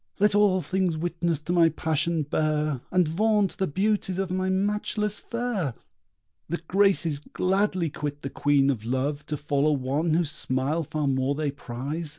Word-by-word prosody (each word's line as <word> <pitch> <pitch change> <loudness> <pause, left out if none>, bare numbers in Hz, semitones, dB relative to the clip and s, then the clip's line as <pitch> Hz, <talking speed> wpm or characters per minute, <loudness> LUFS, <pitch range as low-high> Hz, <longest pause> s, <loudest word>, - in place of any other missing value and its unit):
Let 210 0 +3
all 200 -3 +3
things 185 -4 0
witness 170 0 -1
to 170 +3 -2
my 170 -2 +5
passion 160 +1 0
bear, 150 -2 0
And 180 -3 +3
vaunt 205 +4 +1
the 190 - +1
beauties 190 +3 0
of 190 -1 -2
my 185 0 0
matchless 210 +2 0
fair! 235 - -2 0.7
The 170 - -1
Graces 190 -6 +3
gladly 185 +1 0
quit 145 0 -5
the 135 - -4
Queen 140 -1 +3
of 115 -5 -4
Love 135 +5 -1
To 150 - -2
follow 145 +1 +1
one 145 +4 0
whose 165 -3 +1
smile 140 +2 -1
far 155 -1 -3
more 135 +1 +1
they 150 -1 -1
prize. 140 +4 -5
160 Hz, 160 wpm, -26 LUFS, 145-190 Hz, 0.7 s, my